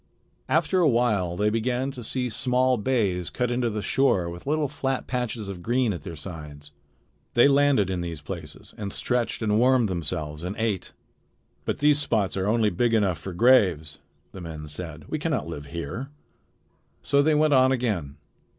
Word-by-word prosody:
After 190 - +2
a 165 -4 +5
while 105 -8 +1
they 105 +2 +2
began 125 +4 -1
to 125 -3 -8
see 125 +3 -2
small 125 +2 +1
bays 105 -7 0
cut 125 -1 -1
into 120 -1 0
the 105 -1 -4
shore 95 -11 +2
with 85 +8 -10
little 150 0 +1
flat 135 0 -2
patches 120 -4 -3
of 95 -3 -6
green 120 +2 +1
at 85 - -6
their 85 - -7
sides. 75 -3 -9 0.6
They 120 +3 +7
landed 140 -8 +3
in 90 -2 -2
these 85 -3 -5
places 80 0 -9
and 100 -2 -4
stretched 120 0 -1
and 105 0 +2
warmed 125 -1 +4
themselves 80 -3 -3
and 90 +3 -4
ate. 110 -5 -2 0.7
"But - - -1
these 150 0 +3
spots 110 -9 0
are 95 0 -1
only 110 -1 +2
big 115 +6 +1
enough 100 -6 +1
for 95 - -6
graves," 90 - +3 0.3
the 95 - -9
men 80 -2 -7
said. 75 0 -6
"We 155 - -3
can 165 - -2
not 130 -8 -1
live 75 -4 -7
here." 85 - -5 0.9
So 140 0 +3
they 155 +1 +3
went 150 0 +3
on 130 0 +5
again. 105 - -1
110 Hz, 180 wpm, -25 LUFS, 85-130 Hz, 0.9 s, They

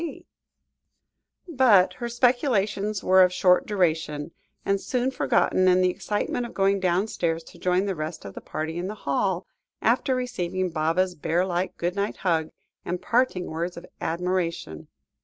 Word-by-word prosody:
C." 335 -3 -6 1.2
But 250 - +4
her 240 -1 -5
speculations 220 -5 +1
were 185 0 +6
of 180 -1 +5
short 180 0 +3
duration, 160 -6 0 0.3
and 195 0 +1
soon 255 +1 -1
forgotten 185 -7 +2
in 185 0 +5
the 185 0 +3
excitement 210 +5 -2
of - - -14
going 195 0 +2
downstairs 175 -3 0
to - - -15
join 185 +2 +1
the 195 - -1
rest 155 - -6
of 100 - -8
the - - -8
party 160 +2 -4
in 180 - -3
the 210 - -5
hall, 180 +6 0 0.3
after 255 +3 +2
receiving 185 -8 -2
Baba's 165 +4 +1
bear 170 +3 0
like 180 0 -2
good 175 +2 -2
night 200 +1 -2
hug, 165 -4 0 0.3
and 180 - -3
parting 235 -6 +1
words 170 +3 -4
of 170 - -9 0.2
admiration. 170 - -2
185 Hz, 160 wpm, -25 LUFS, 170-210 Hz, 1.2 s, were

